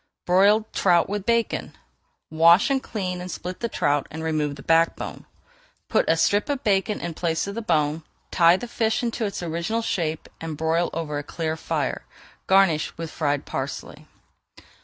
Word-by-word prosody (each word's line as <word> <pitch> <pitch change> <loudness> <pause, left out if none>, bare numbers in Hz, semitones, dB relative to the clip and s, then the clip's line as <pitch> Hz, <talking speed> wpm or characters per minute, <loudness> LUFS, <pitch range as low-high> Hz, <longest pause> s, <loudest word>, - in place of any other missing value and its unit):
BROILED 205 +4 +3
TROUT 175 -3 +3
WITH 205 -1 -4
BACON 235 -1 0 0.5
Wash, 170 +9 +5
clean, 185 -7 -4
and 180 - -6
split 180 +4 -6
a 235 - 0
trout, 145 -6 0
and 160 +1 -7
remove 155 -3 -1
the 135 - -12
back 165 0 +3
bone. - - -8 0.6
Put - - +2
a 165 - +4
strip 205 - +2
of 285 -1 -2
bacon 205 0 +1
in 170 -1 -4
place 165 0 -1
of 200 - -5
the 230 - -4
bone, 155 -5 +1 0.3
tie 170 0 +5
the 245 - -6
fish 225 0 0
into 235 -1 -1
its 200 -3 -4
original 170 +8 -2
shape 160 -7 -2
and 160 -2 -5
broil 160 +2 +1
over 150 -3 -3
a - - -6
clear 160 +1 -3
fire. 160 - -2 0.4
Garnish 190 -5 +3
with 165 -1 -5
fried 145 -3 -1
parsley. - - -6
170 Hz, 170 wpm, -24 LUFS, 160-205 Hz, 0.6 s, Wash